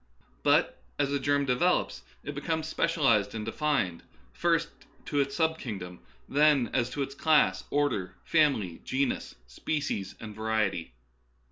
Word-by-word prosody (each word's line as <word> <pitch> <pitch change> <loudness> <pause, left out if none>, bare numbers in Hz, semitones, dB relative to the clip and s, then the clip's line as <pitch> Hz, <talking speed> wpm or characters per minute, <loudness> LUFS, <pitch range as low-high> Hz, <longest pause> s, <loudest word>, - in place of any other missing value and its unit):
But - - +2 0.2
as 140 -1 0
a 140 - +1
germ 145 +1 +1
de 125 -2 +2
velops 180 +7 +1 0.2
it 145 - -5
becomes 160 +2 -2
specialized 120 - +2
and 105 -1 -4
defined, 115 - 0 0.3
first - - +1 0.3
as - - -29
to 145 - -1
its 140 0 0
sub 160 -1 +1
kingdom, 90 -6 -6 0.3
then 145 -4 +3
as 125 -2 +1
to 140 +2 -2
its 135 - -6
class, 155 +2 +3
order, 140 -11 0
family, 135 - +2
genus, 135 0 -1
species, 100 - -3
and 110 -1 -8
variety. 110 - -1
135 Hz, 145 wpm, -29 LUFS, 105-150 Hz, 0.3 s, then